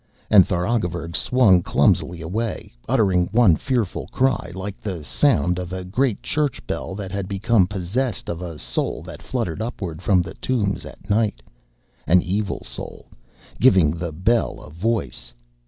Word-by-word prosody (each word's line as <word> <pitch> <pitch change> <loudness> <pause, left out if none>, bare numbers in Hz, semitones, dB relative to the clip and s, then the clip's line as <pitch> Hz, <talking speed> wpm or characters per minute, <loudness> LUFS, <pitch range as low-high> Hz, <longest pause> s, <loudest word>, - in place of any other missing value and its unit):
And 100 -3 +8
Tharagavverug 90 -3 -1
swung 105 -8 +4
clumsily 85 -1 +1
away, 110 - -3 0.2
uttering 90 -5 +3
one 110 -7 +5
fearful 120 - -2
cry 130 -9 0
like 95 +1 -6
the 90 -7 -4
sound 90 - +2
of 90 -1 -5
a 95 0 -4
great 110 +5 0
church 150 -3 -1
bell 95 - -4
that 95 -2 -6
had 100 -1 -3
become 100 0 +2
possessed 100 +4 -2
of 85 +1 -4
a 85 -3 -6
soul - - -2
that - - -10
fluttered 85 +4 -3
upward 95 -8 -5
from 95 -2 +3
the 85 - -8
tombs 105 -6 -1
at - - -14
night 105 - +1 0.6
an 90 +1 +5
evil 100 +3 -2
soul, - - -8 0.5
giving 95 - +5
the 85 +1 -4
bell 105 +9 +1
a 75 - -12
voice. 70 - -3
95 Hz, 155 wpm, -22 LUFS, 85-110 Hz, 0.6 s, And